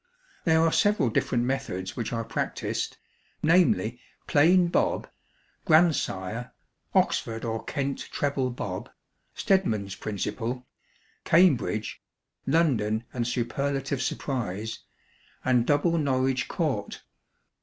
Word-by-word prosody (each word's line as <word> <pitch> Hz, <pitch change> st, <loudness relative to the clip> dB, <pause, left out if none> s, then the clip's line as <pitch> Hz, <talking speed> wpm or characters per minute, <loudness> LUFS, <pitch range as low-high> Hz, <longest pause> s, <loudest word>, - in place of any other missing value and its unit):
There 160 Hz, -1 st, +4 dB
are 165 Hz, -, +3 dB
several 205 Hz, -, +2 dB
different 120 Hz, +2 st, +1 dB
methods 95 Hz, -8 st, -3 dB
which 115 Hz, -, -3 dB
are 115 Hz, -1 st, -2 dB
practised -, -, -3 dB, 0.5 s
namely, 140 Hz, -, +3 dB, 0.3 s
Plain 175 Hz, +5 st, +5 dB
Bob, -, -, +1 dB, 0.6 s
Grandsire, 125 Hz, -, +2 dB, 0.4 s
Oxford 115 Hz, +1 st, +1 dB
or 115 Hz, -1 st, -3 dB
Kent 140 Hz, -2 st, -3 dB
Treble 140 Hz, -3 st, 0 dB
Bob, 100 Hz, -6 st, -5 dB, 0.5 s
Stedman's 110 Hz, -, +1 dB
Principle, 115 Hz, +5 st, -4 dB, 0.6 s
Cambridge, 145 Hz, -, +2 dB, 0.5 s
London 120 Hz, -8 st, +2 dB
and 120 Hz, -2 st, -1 dB
Superlative 135 Hz, +3 st, -1 dB
Surprise, 110 Hz, -6 st, -3 dB, 0.7 s
and 125 Hz, -2 st, +3 dB
Double 165 Hz, +3 st, +2 dB
Norwich 130 Hz, -2 st, +1 dB
Court. -, -, -2 dB
130 Hz, 95 wpm, -27 LUFS, 115-150 Hz, 0.7 s, Plain